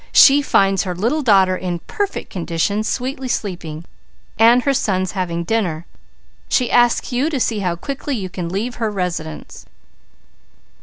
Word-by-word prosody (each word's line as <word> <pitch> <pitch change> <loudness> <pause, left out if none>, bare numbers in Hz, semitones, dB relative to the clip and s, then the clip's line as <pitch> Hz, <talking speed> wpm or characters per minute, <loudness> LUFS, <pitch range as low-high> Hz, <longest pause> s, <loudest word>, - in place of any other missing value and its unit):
She 285 +1 +7
finds 195 -8 +2
her 180 -2 -3
little 235 - 0
daughter 195 -7 +4
in 180 -1 -3
perfect 405 - -4
condition, 180 +3 -1
sweetly 260 +3 -3
sleeping, 170 -8 -4 0.5
and 235 +2 +6
her 280 - +2
sons 185 -7 0
having 170 -3 -2
dinner. 175 -5 -1 0.6
She 250 -2 +1
asks 240 +1 +3
you 255 +5 +1
to 290 -5 -2
see 225 -3 0
how 180 -3 -1
quickly 275 - -4
you 195 -5 -4
can 180 -2 -5
leave 215 +7 -3
her 220 - +1
residence.' 175 -6 -5
200 Hz, 150 wpm, -19 LUFS, 180-245 Hz, 0.6 s, She